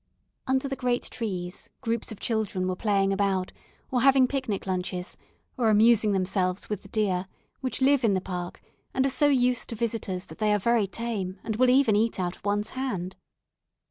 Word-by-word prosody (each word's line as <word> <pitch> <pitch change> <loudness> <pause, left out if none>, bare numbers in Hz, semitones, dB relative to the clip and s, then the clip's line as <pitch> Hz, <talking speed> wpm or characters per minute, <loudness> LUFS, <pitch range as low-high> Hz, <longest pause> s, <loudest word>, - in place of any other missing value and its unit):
Under 265 +1 +1
the 270 - -3
great 250 -2 0
trees, 185 -5 -4
groups 230 -3 -2
of 220 - -8
children 210 -5 -1
were 185 - -1
playing 195 -1 +1
about, 195 -2 0 0.4
or 250 -2 +1
having 265 0 +6
picnic 260 -7 -2
lunches, 180 -1 -3 0.4
or 230 -3 +3
amusing 215 0 +5
themselves 185 -1 0
with 210 - -2
the - - -14
deer, 195 -3 0 0.3
which 260 0 -2
live 275 -1 +4
in 210 -4 +3
the - - +2
park, 180 -1 -6 0.3
and 265 - +3
are - - +3
so 290 - +3
used 250 -3 +2
to 230 - -4
visitors 215 -5 -2
that 160 - -13
they 210 -1 +3
are - - +1
very 230 0 +2
tame, 195 -2 -4
and 220 -1 -3
will 255 +1 +4
even 255 -4 +4
eat 220 0 +1
out 180 -1 -1
of - - -23
one's 205 +1 -1
hand. 195 -9 -3
215 Hz, 190 wpm, -27 LUFS, 190-245 Hz, 0.4 s, having